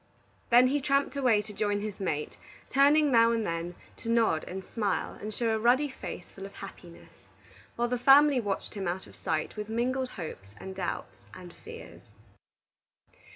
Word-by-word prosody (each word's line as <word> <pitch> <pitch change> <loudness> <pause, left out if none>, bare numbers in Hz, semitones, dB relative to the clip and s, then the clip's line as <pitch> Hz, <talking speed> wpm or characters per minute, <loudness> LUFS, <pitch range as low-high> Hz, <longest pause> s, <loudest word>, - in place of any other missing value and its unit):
Then 245 +2 +6
he 290 +1 0
tramped 275 0 +1
away 245 -7 +3
to 210 0 -10
join 205 0 0
his 210 -2 -5
mate, 150 -6 -2 0.4
turning 285 +2 +5
now 230 -1 +6
and 225 -2 0
then 170 0 -3 0.2
to 230 - -7
nod 225 -9 +2
and 190 +1 -6
smile 205 -5 -2
and 215 - -5
show 230 +2 -1
a 220 - 0
ruddy 255 +6 +3
face 255 -8 -8
full 195 0 -8
of 200 - -16
happiness, 180 -3 -11 0.6
while 240 0 0
the 250 0 -1
family 275 +2 +6
watched 205 -4 -3
him 195 -3 -4
out 180 +2 -3
of - - -16
sight 155 -1 -2
with 210 0 -5
mingled 255 +3 -1
hopes 110 - -8
and 190 - -8
doubts 185 -2 -5
and 180 -2 -11
fears. 460 +1 -11
220 Hz, 175 wpm, -29 LUFS, 190-255 Hz, 0.6 s, Then